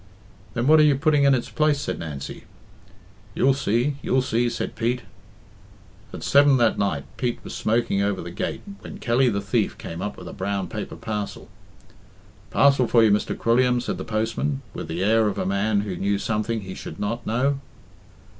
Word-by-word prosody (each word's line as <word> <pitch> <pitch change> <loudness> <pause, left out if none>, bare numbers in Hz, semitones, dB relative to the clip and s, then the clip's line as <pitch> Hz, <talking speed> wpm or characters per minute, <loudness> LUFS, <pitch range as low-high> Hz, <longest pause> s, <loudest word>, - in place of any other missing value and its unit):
"Then 120 0 0
what 155 +3 +6
are - - +7
you 150 -2 +5
putting 145 0 +3
in 140 -1 +6
its 120 - -3
place?" 150 -2 +2
said - - -3
Nancy. 75 -4 -7 0.9
"You'll 135 +1 +4
see, 130 +2 0
you'll 130 0 +1
see," 120 -1 +1
said - - -4
Pete. 120 +1 -1 1.1
At - - -8
seven 140 -1 +5
that 115 -2 +2
night 90 -9 0
Pete 120 -2 -1
was - - -7
smoking 110 -3 +1
over 100 -1 0
the 85 - -6
gate 90 - -4 0.2
when - - -9
Kelly 125 +1 +2
the 100 -3 -1
Thief 105 +2 0
came 85 +2 -7
up 105 +1 -4
with - - -9
a - - -7
brown 100 -2 -2
paper - - -5
parcel. 105 -2 -5 1.0
"Parcel 135 +3 +4
for 115 -1 +5
you, 110 - +5
Mr. 105 - 0
Quilliam," 125 +1 +3
said 120 - -3
the - - -3
postman, 115 +6 -2
with - - -6
the 85 +3 -2
air 110 +1 +4
of 105 - -2
a - - -1
man 100 +2 +1
who 100 -3 -4
knew 100 +3 0
something 110 +2 -1
he 95 -1 -7
should - - -8
not 115 +4 -3
know. 135 +5 +1
115 Hz, 190 wpm, -24 LUFS, 100-130 Hz, 1.1 s, are